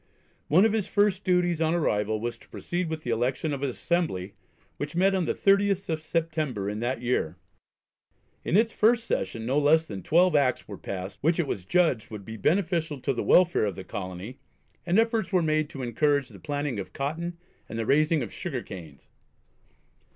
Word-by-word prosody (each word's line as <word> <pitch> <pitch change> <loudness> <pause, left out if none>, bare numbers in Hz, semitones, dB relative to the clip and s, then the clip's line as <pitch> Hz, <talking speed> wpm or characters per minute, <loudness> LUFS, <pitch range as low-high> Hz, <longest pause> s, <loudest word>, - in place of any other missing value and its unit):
One 180 +8 +5
of 220 - +2
his 215 -3 0
first 205 -1 +2
duties 175 -3 +2
on 160 +1 +2
arrival 110 -9 0
was 120 +2 -4
to - - -20
proceed 175 -1 -3
with 160 -1 -4
the 120 - -2
election 125 +6 0
of 140 - -4
an 140 - 0
Assembly, 125 - -1 0.4
which 145 +2 -5
met 190 +3 +3
on 185 -3 +1
the - - -1
30th 195 -1 +2
of 160 -1 -1
September 155 - -2
in 105 +1 -3
that 120 +1 -2
year. 95 -9 0 1.1
In 180 - +2
its 225 +1 +3
first 230 +2 +3
session 115 - -2
no 135 +5 +2
less 155 +2 +4
than 100 -9 -7
twelve 175 - +3
Acts 135 -4 +2
were 100 - -8
passed 95 0 -6
which 165 +4 +2
it 170 - +2
was 95 -9 -4
judged 160 - +2
would 105 -3 -8
be 110 - -7
beneficial 160 - 0
to 135 - -1
the 120 - -2
welfare 175 -10 +4
of 100 -4 -2
the 95 - -7
colony, 95 +7 -7 0.5
and 175 +3 +3
efforts 225 -2 +2
were 180 -3 +3
made 155 -1 +1
to 135 - -7
encourage 140 +3 +1
the - - -13
planting 145 -5 -3
of 95 -2 -7
cotton 165 +5 -3 0.3
and 110 - -5
the 115 - -1
raising 150 +3 +3
of 110 - -7
sugar - - -4
canes. 80 -7 -11
150 Hz, 195 wpm, -27 LUFS, 115-175 Hz, 1.1 s, One